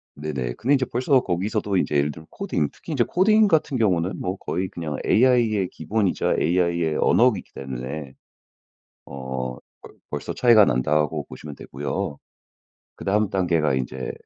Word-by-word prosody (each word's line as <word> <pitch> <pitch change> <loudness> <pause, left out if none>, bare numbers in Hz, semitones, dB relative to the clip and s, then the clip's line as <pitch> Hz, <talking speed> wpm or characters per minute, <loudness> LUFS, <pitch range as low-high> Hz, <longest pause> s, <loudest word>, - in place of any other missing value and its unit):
네네 70 -5 -3
근데 135 +5 +1
이제 130 -1 +1
벌써 130 +3 +2
거기서도 100 +2 -1
이제 75 - 0
예를 70 +1 +1
들면 80 +2 -13
코딩 75 - -2
특히 160 - -8
이제 125 -4 +3
코딩 215 - +4
같은 150 -4 +2
경우는 95 -4 +1
뭐 95 +2 -3
거의 95 +1 -3
그냥 80 -3 -5
AI의 115 -5 +3
기본이자 100 +4 0
AI의 85 -2 +1
언어이기 115 -6 +3
때문에 65 +2 -6 0.9
어 65 -2 -5 0.3
벌 - - -13 0.2
벌써 75 -1 -4
차이가 115 -5 +6
난다고 75 +4 +1
보시면 70 +3 -10
되고요. 70 +1 -4 0.8
그다음 105 +1 0
단계가 85 -6 +1
이제 65 0 -3
85 Hz, 325 characters per minute, -23 LUFS, 70-110 Hz, 0.9 s, 차이가